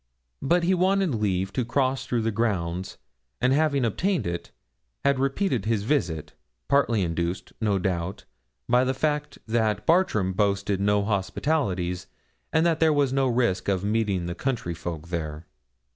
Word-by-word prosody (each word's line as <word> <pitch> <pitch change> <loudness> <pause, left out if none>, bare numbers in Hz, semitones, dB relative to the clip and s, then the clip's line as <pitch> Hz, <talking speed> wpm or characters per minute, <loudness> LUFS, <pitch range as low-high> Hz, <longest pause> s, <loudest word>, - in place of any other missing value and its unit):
But 175 +5 +2
he 180 +2 +3
wanted 190 -2 +2
leave 95 -3 0
to 130 - 0
cross 130 +2 0
through 120 -2 0
the 115 - +1
grounds, 95 -5 -1 0.4
and 125 +1 +3
having 140 -3 +2
obtained 180 - 0
it, 85 0 -4 0.6
had 140 -1 +3
repeated 135 - 0
his 110 -2 0
visit, 95 - -1 0.3
partly 120 -7 +3
induced, 85 +1 -3
no 105 -3 +2
doubt, 90 0 -2 0.4
by 125 +1 +4
the 130 +1 0
fact 150 +1 -1
that 110 -2 0
Bartram 160 - +2
boasted 100 0 +1
no 105 0 +2
hospitalities, 95 - -1 0.4
and 160 - +3
that 165 -2 +2
there 160 -1 +4
was 140 -3 +2
no 135 -1 +2
risk 120 -6 +1
of 95 -1 0
meeting 105 -4 0
the 85 - -3
county 115 -4 -2
folk 80 0 -6
there. 80 -2 -4
110 Hz, 155 wpm, -26 LUFS, 95-140 Hz, 0.6 s, by